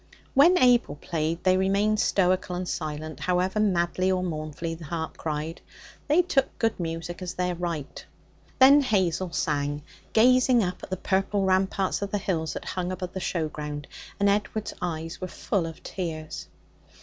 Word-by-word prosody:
When 335 +7 +6
Abel 245 - +4
played, 160 +2 -2
they 185 0 +4
remained 200 +3 +2
stoical 185 -2 +2
and 180 0 -3
silent, 155 -1 -4
however 185 +3 0
madly 185 -2 +2
or 185 -1 0
mournfully 155 -1 -4
the 165 0 -9
harp 160 +1 -4
cried. 155 +1 -4 0.5
They 310 +5 +4
took 285 -6 0
good 225 -3 0
music 165 +1 -4
as 180 -1 -5
their 180 0 0
right. 170 -4 -4 0.5
Then 275 +2 +8
Hazel 185 - +1
sang, 145 -3 -1 0.3
gazing 250 +1 +5
up 180 -1 -3
at - - -9
the 185 - -2
purple 195 +2 0
ramparts 190 +1 +1
of 200 - -2
the 205 - 0
hills 170 -5 -2
that - - -6
hung 180 -1 -3
above 180 -1 -5
the 190 - -3
show 170 -3 -1
ground, 150 -1 -6 0.3
and 200 - +3
Edward's 210 +1 0
eyes 165 -1 -4
were 185 - -2
full 180 -1 -1
of 165 - -10
tears. 160 -4 -5
180 Hz, 165 wpm, -26 LUFS, 165-200 Hz, 0.5 s, Then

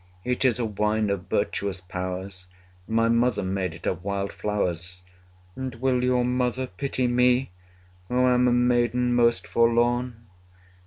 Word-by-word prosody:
It 125 +3 -1
is 125 -4 +3
a 120 - -1
wine 105 0 0
of 100 -2 -3
virtuous 100 -2 -1
powers; 90 0 -6 0.4
My 115 +1 +2
mother 115 -2 +2
made 95 -3 -2
it 80 - -12
of 90 -1 -2
wild 100 0 -3
flowers. 90 -3 -3 0.5
And 130 -2 -5
will 125 +1 0
your 125 -1 +2
mother 125 +1 0
pity 130 0 -3
me, 125 0 +2 0.6
Who 125 +1 +2
am 125 0 +4
a - - +3
maiden 120 0 +2
most 120 -1 +3
forlorn? 120 0 +1
115 Hz, 145 wpm, -25 LUFS, 100-125 Hz, 0.6 s, am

